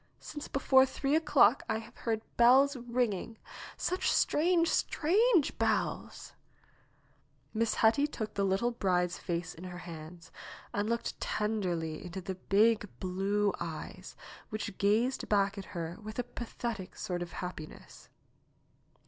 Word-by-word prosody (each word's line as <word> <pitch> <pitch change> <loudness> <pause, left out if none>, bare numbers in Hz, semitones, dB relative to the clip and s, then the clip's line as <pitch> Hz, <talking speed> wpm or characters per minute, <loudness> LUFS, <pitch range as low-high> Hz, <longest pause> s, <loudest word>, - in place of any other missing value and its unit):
Since 295 -1 -7
before 265 -1 +5
three 275 +2 0
o'clock 290 -6 +5
I - - +1
have 220 - -10
heard 225 -1 -2
bells 265 +4 +6
ringing; 235 -3 -2 0.4
such 365 - 0
strange, 335 +2 +3
strange 365 - +2
bells - - -1 0.6
!" - - -38
Miss 225 0 +1
Hetty 230 +6 +4
took 220 -7 -5
the 200 - 0
little 195 +5 +1
bride's 180 -6 0
face 170 -1 -3
in 165 - -12
her 180 -1 -7
hands 170 -1 -10 0.4
and 205 +2 -1
looked 235 0 -2
tenderly 180 -7 -2
into 180 +1 -6
the 190 +1 -4
big 210 +3 +2
blue 195 +2 0
eyes, 165 -2 -7 0.3
which 215 -2 -5
gazed 225 +6 +1
back 200 -1 +2
at 195 - -7
her 170 +1 -4
with 215 +1 -8
a 245 - 0
pathetic 235 -4 -6
sort 180 -1 -3
of 175 -1 -6
happiness. 180 -4 -8
215 Hz, 135 wpm, -31 LUFS, 180-245 Hz, 0.6 s, bells